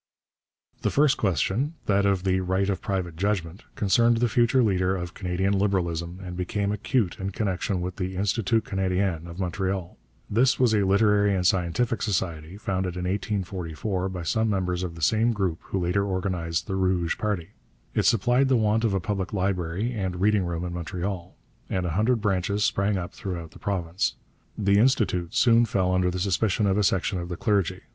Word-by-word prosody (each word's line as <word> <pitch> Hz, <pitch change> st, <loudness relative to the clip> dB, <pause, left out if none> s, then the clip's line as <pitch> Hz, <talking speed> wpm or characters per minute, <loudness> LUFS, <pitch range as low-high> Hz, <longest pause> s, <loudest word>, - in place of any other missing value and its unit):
The -, -, +1 dB
first 150 Hz, 0 st, +3 dB
question, 105 Hz, -, 0 dB
that 100 Hz, 0 st, +2 dB
of 95 Hz, -2 st, +1 dB
the 95 Hz, -1 st, +2 dB
right 95 Hz, +1 st, 0 dB
of 95 Hz, -, -3 dB
private 90 Hz, -4 st, -2 dB
judgment, 95 Hz, 0 st, -2 dB
concerned 115 Hz, +3 st, +3 dB
the 120 Hz, +1 st, +2 dB
future 120 Hz, +2 st, +3 dB
leader 95 Hz, -3 st, +1 dB
of 90 Hz, -1 st, -5 dB
Canadian 95 Hz, +1 st, -1 dB
Liberalism 90 Hz, -3 st, -1 dB
and 90 Hz, -1 st, -6 dB
became 100 Hz, +3 st, -1 dB
acute 105 Hz, -1 st, 0 dB
in 95 Hz, 0 st, -2 dB
connection 95 Hz, -2 st, -2 dB
with 90 Hz, 0 st, -4 dB
the 95 Hz, -1 st, -3 dB
Institut 105 Hz, +3 st, +1 dB
Canadien 95 Hz, -3 st, -1 dB
of 85 Hz, +2 st, -9 dB
Montreal. 95 Hz, 0 st, -3 dB, 0.3 s
This 125 Hz, +5 st, +2 dB
was 125 Hz, -3 st, +4 dB
a 105 Hz, -, +3 dB
literary 100 Hz, 0 st, +3 dB
and 90 Hz, -1 st, -1 dB
scientific 95 Hz, +6 st, +1 dB
society, 85 Hz, -4 st, -2 dB
founded 95 Hz, -3 st, -2 dB
in 90 Hz, -, -3 dB
1844 95 Hz, -1 st, -2 dB
by 90 Hz, -2 st, -5 dB
some 110 Hz, +6 st, +1 dB
members 90 Hz, -3 st, -1 dB
of 90 Hz, -2 st, -4 dB
the 80 Hz, -, -7 dB
same 115 Hz, +7 st, +3 dB
group 95 Hz, -6 st, -1 dB
who -, -, -3 dB
later 90 Hz, +2 st, +1 dB
organized 90 Hz, -4 st, -2 dB
the 95 Hz, -, -3 dB
Rouge 95 Hz, -3 st, 0 dB
party. 100 Hz, -5 st, -2 dB, 0.4 s
It -, -, +1 dB
supplied 120 Hz, +5 st, +3 dB
the 130 Hz, -, +3 dB
want 110 Hz, 0 st, +2 dB
of 105 Hz, -4 st, +2 dB
a -, -, +1 dB
public 95 Hz, +1 st, -3 dB
library 95 Hz, +3 st, -1 dB
and 95 Hz, -5 st, -3 dB
reading 100 Hz, -1 st, +3 dB
room 85 Hz, 0 st, -3 dB
in 90 Hz, -, -4 dB
Montreal, 90 Hz, +1 st, -5 dB, 0.3 s
and 95 Hz, -1 st, -1 dB
a 85 Hz, -, -1 dB
hundred 110 Hz, +6 st, +1 dB
branches 100 Hz, 0 st, 0 dB
sprang 100 Hz, -1 st, +1 dB
up 90 Hz, -1 st, -5 dB
throughout 85 Hz, -5 st, -6 dB
the -, -, -15 dB
province. 90 Hz, -2 st, -1 dB, 0.4 s
The 100 Hz, -1 st, +3 dB
Institut 105 Hz, -8 st, +1 dB
soon 120 Hz, -1 st, +5 dB
fell 95 Hz, -4 st, 0 dB
under 90 Hz, 0 st, +2 dB
the 90 Hz, -, -3 dB
suspicion 100 Hz, +2 st, +1 dB
of 100 Hz, +1 st, +2 dB
a -, -, +2 dB
section 95 Hz, 0 st, +1 dB
of 85 Hz, 0 st, -6 dB
the 85 Hz, -, -4 dB
clergy. 100 Hz, -7 st, 0 dB
95 Hz, 185 wpm, -26 LUFS, 90-105 Hz, 0.4 s, soon